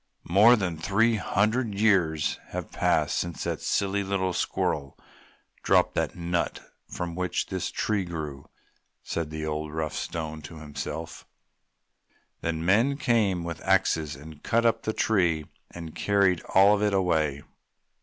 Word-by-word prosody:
"More 105 +6 +7
than 95 -7 -2
three 110 +6 +2
hundred 110 +2 0
years 90 -8 +2
have - - -6
passed - - +1
since 85 -1 -4
that - - -3
silly 100 0 0
little 95 -1 -1
squirrel 70 -4 -2 0.6
dropped - - +3
the - - +1
nut 85 0 -2 0.3
from 85 -1 -5
which 90 +1 -1
this 95 -1 -3
tree 105 -3 -1
grew!" 75 -6 -6 0.5
said 85 -2 -3
the 80 0 -5
old, 75 0 -3
rough 80 -1 -3
Stone 80 -2 -4
to 85 - -11
himself. 80 +2 -6 1.1
Then 80 0 -2
men 115 +9 +3
came 105 - +1
with 85 -2 -5
axes 80 -6 +1
and 75 +2 -12
cut 115 +1 +1
up 115 -1 +3
the 110 - -2
tree 90 -10 +1 0.2
and 85 -2 -8
carried 100 -3 +2
all 100 +2 +7
of 105 - +1
it 105 -1 +2
away. 80 -7 +1
90 Hz, 145 wpm, -27 LUFS, 80-100 Hz, 1.1 s, More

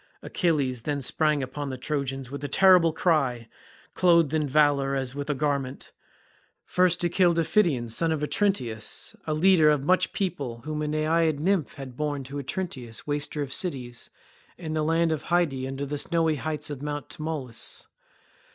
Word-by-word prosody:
Achilles 145 - 0
then 145 +4 -2
sprang 150 +1 +1
upon 140 +2 -5
the 130 - -5
Trojans 135 -2 -3
with 140 0 -6
a - - -1
terrible 180 +2 +5
cry, 140 -8 +1 0.5
clothed 170 -4 +4
in 155 -2 +1
valour 140 -1 +3
as 130 -2 -2
with 145 +1 -5
a 150 - +1
garment. 140 -2 -2 0.7
First 180 -1 +2
he - - +4
killed 175 -1 +3
Iphition 165 - +2
son 160 +9 0
of 155 -2 -1
Otrynteus, 135 - -1
a 155 - 0
leader 165 -1 +5
of 150 -2 +2
much 185 +5 +2
people 140 - -3
whom 155 0 -3
a 150 - -1
naiad 155 0 +1
nymph 180 -2 0
had 130 -3 -9
borne 145 -2 -2
to 140 +2 -6
Otrynteus 135 - -5
waster 145 0 -2
of 135 -2 -6
cities, 125 -9 -4 0.5
in 160 -3 -5
the 155 - 0
land 165 +1 +2
of 155 -2 -1
Hyde 175 -4 +2
under 135 +1 -4
the 145 +1 -3
snowy 165 -1 +1
heights 150 +1 -4
of 140 -2 -6
Mt. 145 -1 -4
Tmolus. 150 -6 -5
150 Hz, 170 wpm, -26 LUFS, 135-165 Hz, 0.7 s, terrible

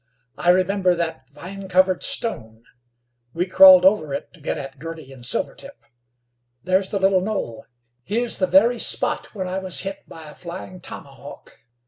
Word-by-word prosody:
"I 175 - 0
remember 185 0 +2
that 160 -6 -4
vine 190 +7 -10
covered 185 0 +2
stone. 110 - -2 0.7
We 175 +2 0
crawled 185 -1 +8
over 160 -8 +3
it - - -8
to 170 - -18
get - - -3
at 135 0 -8
Girty 160 -3 -9
and 125 -2 -14
Silvertip. 120 - -1 0.9
There's 185 +1 +1
the 200 - -2
little 190 -1 +2
knoll; 190 - -4 0.4
here's 230 - -1
the 185 - +1
very 225 +7 +4
spot - - -1
where 190 -2 -3
I 185 +1 -3
was 185 -2 0
hit 195 0 -6
by 160 -1 -11
a 150 - -11
flying 180 +1 -9
tomahawk. 140 -4 -11
185 Hz, 160 wpm, -22 LUFS, 150-190 Hz, 0.9 s, crawled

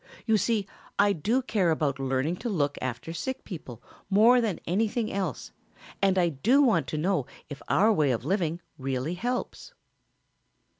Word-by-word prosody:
You 220 - +3
see 215 0 +1 0.3
I 205 0 +4
do 225 - 0
care 200 -8 +1
about 150 -4 0
learning 135 +5 -1
to 240 - -4
look 145 -8 0
after 130 +6 -4
sick 260 +10 -4
people 130 - -9 0.3
more 225 +5 +6
than 215 -6 -1
anything 215 +4 0
else 190 -9 -3 0.5
and 195 -1 +3
I 175 -2 +3
do 195 - +2
want 245 -5 +2
to 155 - -3
know 160 -4 0 0.2
if 145 -2 -8
our 215 +3 +4
way 150 -7 +2
of 120 -1 -1
living 170 -1 -1 0.2
really 135 +4 -2
helps." 250 - -4
180 Hz, 160 wpm, -27 LUFS, 145-220 Hz, 0.5 s, more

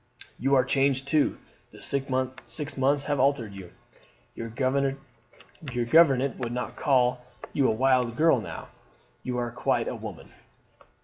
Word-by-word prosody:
You 135 +2 +2
are 130 - +5
changed 135 0 +1
too 150 0 +2 0.3
the - - -15
six 140 0 +1
months 135 +2 -1
have 145 -1 -1
altered 130 -6 +1
you. 95 -3 -10 0.6
Your 115 - -6
gouvernante 135 +2 0
would 120 -2 -3
not 125 +1 -4
call 125 -3 +2 0.3
you 135 -2 +2
a - - +3
wild 125 -1 +2
girl 155 -7 +4
now. - - -8 0.5
You 125 -1 -4
are 120 -1 -2
quite 120 - 0
a - - -2
woman. - - -9
130 Hz, 135 wpm, -27 LUFS, 125-140 Hz, 0.6 s, are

